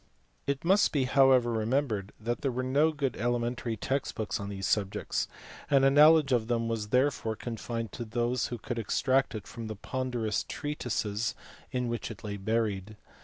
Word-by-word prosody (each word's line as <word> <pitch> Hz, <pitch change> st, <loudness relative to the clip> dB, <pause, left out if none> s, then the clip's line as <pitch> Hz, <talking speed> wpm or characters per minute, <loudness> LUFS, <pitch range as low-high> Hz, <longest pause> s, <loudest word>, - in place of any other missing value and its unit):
It 140 Hz, +2 st, -1 dB
must 195 Hz, +4 st, +4 dB
be 140 Hz, -3 st, +2 dB
however 130 Hz, -2 st, +4 dB
remembered 110 Hz, -3 st, 0 dB
that 120 Hz, +3 st, -2 dB
there 140 Hz, -3 st, 0 dB
were 130 Hz, +1 st, -2 dB
no 145 Hz, +5 st, +3 dB
good 140 Hz, -4 st, -2 dB
elementary 120 Hz, 0 st, -1 dB
text 135 Hz, +6 st, -2 dB
books 105 Hz, -3 st, -2 dB
on 100 Hz, 0 st, -5 dB
these 95 Hz, -1 st, -4 dB
subjects; 100 Hz, -2 st, 0 dB, 0.4 s
and 135 Hz, -2 st, +5 dB
a 135 Hz, -, +6 dB
knowledge 150 Hz, 0 st, +6 dB
of 115 Hz, -3 st, +2 dB
them 115 Hz, -1 st, 0 dB
was 115 Hz, -2 st, -2 dB
therefore 125 Hz, -2 st, +1 dB
confined 115 Hz, -1 st, -4 dB
to 120 Hz, -, -6 dB
those 120 Hz, +1 st, 0 dB
who 120 Hz, -, -5 dB
could 120 Hz, +2 st, -4 dB
extract 130 Hz, +4 st, +1 dB
it 110 Hz, -, -6 dB
from 115 Hz, -2 st, -7 dB
the 110 Hz, -, -5 dB
ponderous 120 Hz, -1 st, -2 dB
treatises 115 Hz, -6 st, -2 dB, 0.4 s
in 125 Hz, -1 st, -1 dB
which 120 Hz, 0 st, -3 dB
it 110 Hz, -4 st, -9 dB
lay 100 Hz, -1 st, -4 dB
buried. 105 Hz, -1 st, -1 dB
120 Hz, 175 wpm, -29 LUFS, 110-130 Hz, 0.4 s, a